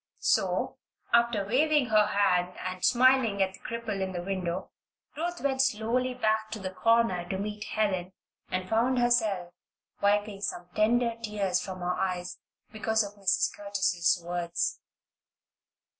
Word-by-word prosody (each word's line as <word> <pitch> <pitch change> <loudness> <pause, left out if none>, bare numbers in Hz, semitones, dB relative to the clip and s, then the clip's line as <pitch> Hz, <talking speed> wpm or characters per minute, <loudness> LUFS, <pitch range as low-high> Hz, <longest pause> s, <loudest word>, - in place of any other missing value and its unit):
So, - - +1 0.4
after 235 -4 +3
waving 290 +6 +3
her 215 -1 +4
hand 180 -3 +1
and 185 0 -5
smiling 250 -4 +4
at 190 -1 +1
the - - -13
cripple 230 -4 -4
in 190 0 -2
the 175 -1 -4
window, 185 -1 -3 0.4
Ruth 345 +3 -3
went 270 -1 +1
slowly 250 +1 0
back 220 -2 0
to 220 - -5
the 190 -1 -4
corner 210 -5 +2
to 190 - -2
meet 210 +1 -4
Helen, 190 -4 -1 0.4
and 185 0 -2
found 235 +5 +2
herself 220 -8 +1 0.5
wiping 205 0 +1
some 175 -3 -4
tender 230 +2 +2
tears 200 -4 -1
from 185 -1 -7
her 180 0 0
eyes 180 -1 -3 0.3
because 220 0 +1
of 205 0 -7
Mrs. 190 - +2
Curtis's 195 -4 +1
words. 175 -1 -2
205 Hz, 145 wpm, -28 LUFS, 185-230 Hz, 0.5 s, her